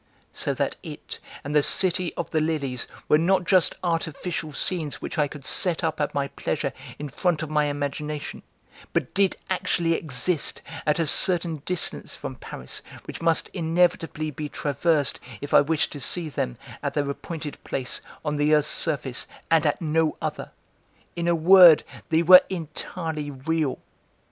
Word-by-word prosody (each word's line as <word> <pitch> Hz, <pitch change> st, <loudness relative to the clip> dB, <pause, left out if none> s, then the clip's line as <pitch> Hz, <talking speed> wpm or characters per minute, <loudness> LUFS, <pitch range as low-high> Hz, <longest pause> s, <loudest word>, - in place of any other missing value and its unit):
So -, -, -1 dB
that -, -, -1 dB
it -, -, -8 dB, 0.2 s
and 145 Hz, -, -4 dB
the 150 Hz, -, +5 dB
City 185 Hz, +2 st, +2 dB
of 170 Hz, -, -4 dB
the 160 Hz, -, +2 dB
Lilies 145 Hz, -6 st, -1 dB, 0.2 s
were 150 Hz, -, +5 dB
not 180 Hz, +2 st, +3 dB
just 185 Hz, 0 st, +3 dB
artificial 165 Hz, -1 st, -2 dB
scenes 155 Hz, 0 st, -1 dB
which -, -, -5 dB
I 150 Hz, -, +3 dB
could 140 Hz, -1 st, -11 dB
set 175 Hz, +2 st, -1 dB
up 160 Hz, -2 st, -1 dB
at 145 Hz, -, -1 dB
my 140 Hz, -1 st, 0 dB
pleasure 140 Hz, -2 st, -2 dB, 0.2 s
in 150 Hz, -, -5 dB
front 165 Hz, +2 st, 0 dB
of 155 Hz, -, -6 dB
my 150 Hz, -1 st, +3 dB
imagination, 145 Hz, +1 st, -4 dB, 0.5 s
but -, -, -1 dB
did 195 Hz, -1 st, +2 dB
actually 175 Hz, -2 st, 0 dB
exist 160 Hz, +2 st, -1 dB, 0.2 s
at 150 Hz, -, +3 dB
a 165 Hz, -, +1 dB
certain 170 Hz, 0 st, +3 dB
distance 180 Hz, -2 st, -2 dB
from 135 Hz, -, -6 dB
Paris 65 Hz, -, -6 dB, 0.2 s
which -, -, -8 dB
must 165 Hz, -1 st, +1 dB
inevitably 165 Hz, -2 st, +1 dB
be 150 Hz, +1 st, -5 dB
traversed 145 Hz, 0 st, 0 dB, 0.2 s
if 145 Hz, -, -6 dB
I -, -, +8 dB
wished 155 Hz, +2 st, 0 dB
to 145 Hz, -, -7 dB
see 160 Hz, +5 st, -1 dB
them, 60 Hz, -, -3 dB, 0.2 s
at -, -, -3 dB
their 145 Hz, -1 st, 0 dB
appointed 150 Hz, +1 st, -6 dB
place 130 Hz, -2 st, -3 dB, 0.2 s
on 150 Hz, -1 st, -1 dB
the 150 Hz, +1 st, +4 dB
earth's 150 Hz, 0 st, +2 dB
surface, 140 Hz, -6 st, -1 dB, 0.2 s
and 160 Hz, -2 st, +4 dB
at 150 Hz, -, -1 dB
no 160 Hz, 0 st, +1 dB
other; -, -, -4 dB, 0.7 s
in 170 Hz, 0 st, -2 dB
a 170 Hz, -, +3 dB
word 175 Hz, -1 st, +8 dB, 0.3 s
they 160 Hz, +1 st, +3 dB
were 180 Hz, +2 st, +10 dB
entirely 160 Hz, -3 st, -4 dB
real. 145 Hz, +1 st, -1 dB
155 Hz, 165 wpm, -25 LUFS, 145-170 Hz, 0.7 s, were